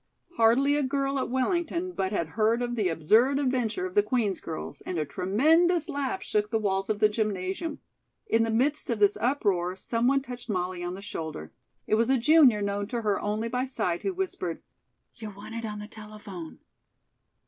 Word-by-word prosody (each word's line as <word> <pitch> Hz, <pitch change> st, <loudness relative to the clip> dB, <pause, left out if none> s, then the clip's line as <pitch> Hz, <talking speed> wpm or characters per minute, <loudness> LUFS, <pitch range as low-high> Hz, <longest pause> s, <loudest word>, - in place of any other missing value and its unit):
Hardly 250 Hz, +6 st, +4 dB
a 295 Hz, -, +1 dB
girl 275 Hz, 0 st, 0 dB
at -, -, -2 dB
Wellington 340 Hz, +7 st, -1 dB
but 190 Hz, -, -2 dB
had 170 Hz, -6 st, -1 dB
heard 225 Hz, +5 st, +1 dB
of 240 Hz, 0 st, -2 dB
the 210 Hz, -6 st, +1 dB
absurd 220 Hz, -, +3 dB
adventure 260 Hz, -, 0 dB
of 370 Hz, -, -5 dB
the 415 Hz, -, +5 dB
Queen's 235 Hz, -, -1 dB
girls, 160 Hz, -, -6 dB
and 180 Hz, -, -4 dB
a 155 Hz, -, 0 dB
tremendous 310 Hz, -, +2 dB
laugh 285 Hz, +4 st, -3 dB
shook 210 Hz, 0 st, 0 dB
the 225 Hz, -, +1 dB
walls 195 Hz, -2 st, -1 dB
of 215 Hz, -, +1 dB
the 215 Hz, -, +5 dB
gymnasium. 210 Hz, -, -2 dB, 0.5 s
In 230 Hz, -, +2 dB
the 225 Hz, -, +1 dB
midst 265 Hz, +7 st, +1 dB
of 235 Hz, -, 0 dB
this 205 Hz, -1 st, +4 dB
uproar, 195 Hz, -9 st, 0 dB
someone 245 Hz, +7 st, +1 dB
touched 245 Hz, -2 st, -9 dB
Molly 180 Hz, -2 st, -2 dB
on 175 Hz, +1 st, -3 dB
the 195 Hz, -, -9 dB
shoulder. 160 Hz, -, -6 dB, 0.3 s
It -, -, -2 dB
was 230 Hz, -, 0 dB
a 265 Hz, -, +4 dB
junior 255 Hz, -5 st, +5 dB
known 200 Hz, 0 st, -2 dB
to 235 Hz, +1 st, -3 dB
her 205 Hz, -2 st, +1 dB
only 215 Hz, +2 st, -1 dB
by 250 Hz, +2 st, -1 dB
sight, 180 Hz, -10 st, -2 dB
who 385 Hz, -, -2 dB
whispered: 350 Hz, -, -3 dB, 0.5 s
"You're 215 Hz, -3 st, -8 dB
wanted 225 Hz, +3 st, -6 dB
on 210 Hz, -1 st, -5 dB
the 210 Hz, 0 st, -7 dB
telephone." 210 Hz, -6 st, -9 dB
225 Hz, 190 wpm, -27 LUFS, 200-270 Hz, 0.5 s, the